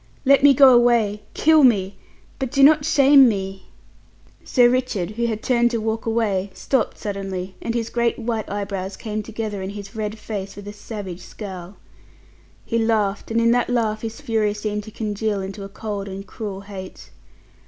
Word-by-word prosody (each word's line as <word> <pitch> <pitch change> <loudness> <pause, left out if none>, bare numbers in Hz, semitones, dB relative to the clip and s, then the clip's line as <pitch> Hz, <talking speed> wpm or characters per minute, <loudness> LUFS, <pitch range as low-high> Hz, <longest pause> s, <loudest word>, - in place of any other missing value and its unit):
Let 275 +1 +5
me 280 -1 +6
go 265 -1 +8
away; 235 -4 +3
kill 315 -1 +5
me; 200 -6 +3 0.4
but 265 - -2
do 275 -1 +3
not 295 0 +6
shame 275 -3 +6
me." 195 -2 -4 0.8
Sir 245 -2 +4
Richard, 240 -7 -1
who 235 +2 -1
had 220 -2 -3
turned 240 -1 +3
to 235 - -1
walk 225 +1 -3
away, 205 -4 0
stopped 265 -5 -1
suddenly, 195 -2 -5
and 230 - -3
his 230 -1 -2
great 235 -1 0
white 225 -2 -3
eyebrows 195 -1 -4
came 215 -1 -4
together 215 -2 -5
in 190 - -4
his 200 0 -9
red 215 0 -4
face 210 -2 -6
with 205 0 -10
a 205 - -6
savage 205 -4 -7
scowl. 190 -1 -9 0.9
He 230 - 0
laughed, 215 -3 0
and 230 0 +1
in 230 0 +3
that 245 0 +1
laugh 220 -3 0
his 225 0 -6
fury 215 -2 0
seemed 210 0 -3
to 220 - -10
congeal 210 -1 -2
into 195 +1 -6
a 195 - -8
cold 205 -1 -5
and 195 0 -7
cruel 200 -3 -6
hate. 195 -2 -10
215 Hz, 180 wpm, -22 LUFS, 200-235 Hz, 0.9 s, go